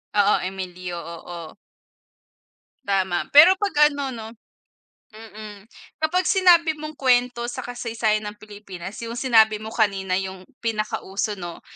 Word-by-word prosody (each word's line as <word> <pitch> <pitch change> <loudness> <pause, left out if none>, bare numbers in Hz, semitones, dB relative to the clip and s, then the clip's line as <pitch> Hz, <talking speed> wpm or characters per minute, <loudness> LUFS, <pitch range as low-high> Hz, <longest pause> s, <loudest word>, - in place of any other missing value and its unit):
Oo, 205 0 +4
Emilio, 185 -1 -6
oo. 170 +1 -9 1.3
Tama. 190 -3 0
Pero 335 +6 +9
pag 300 -8 +3
ano, 280 -2 -4
'no, 220 -1 -7 0.9
mm, 215 -1 -11 0.3
kapag 360 +4 +1
sinabi 345 -4 +4
mong 305 0 -8
kwento 245 -2 +2
sa 240 - -5
kasaysayan 230 -3 -2
ng 210 - -7
Pilipinas 200 -3 -9
yung 230 +1 -6
sinabi 225 -4 +4
mo 220 - -6
kanina 195 -5 0
yung 190 -1 -6 0.2
pinakauso, 215 -2 -3
'no, 175 -1 -7
215 Hz, 120 wpm, -23 LUFS, 190-250 Hz, 1.3 s, Pero